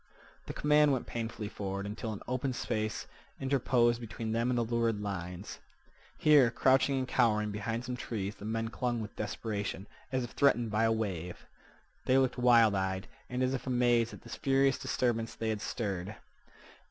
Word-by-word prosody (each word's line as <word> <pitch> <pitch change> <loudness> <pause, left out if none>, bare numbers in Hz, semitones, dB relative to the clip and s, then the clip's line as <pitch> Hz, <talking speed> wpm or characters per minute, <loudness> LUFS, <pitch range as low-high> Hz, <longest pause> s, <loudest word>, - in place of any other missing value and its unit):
The - - -4
command 150 0 +4
went 130 -3 0
painfully 115 -2 -4
forward 100 -1 -4
until 105 +2 -4
an 105 - -7
open 130 +1 -1
space 110 -3 -2 0.3
interposed 125 -3 +2
between 115 -1 -5
them 115 +2 +1
and 125 - +1
the 120 - +2
lurid 115 -2 0
lines. 95 -2 -5 0.6
Here, 145 -5 +6
crouching 135 +3 +3
and 130 -1 -1
cowering 105 -5 +2
behind 115 +3 -3
some 125 0 -3
trees, 105 -5 -4
the - - -13
men 115 +1 -2
clung 120 0 -2
with 105 -2 -7
desperation, 105 -2 -3 0.3
as 130 -1 0
if 120 - -6
threatened 120 -6 +2
by 110 +2 +2
a 115 - +3
wave. 95 -6 -3 0.6
They 130 - +4
looked 130 -1 +2
wild 120 -3 +6
eyed, 95 0 -1 0.2
and 125 +1 -1
as 130 +1 +1
if 135 - -4
amazed 120 -2 +3
at - - -11
this - - -7
furious 135 0 +2
disturbance 115 -2 -1
they 110 - -2
had 110 -2 -2
stirred. 100 -3 -3
115 Hz, 175 wpm, -31 LUFS, 105-125 Hz, 0.6 s, Here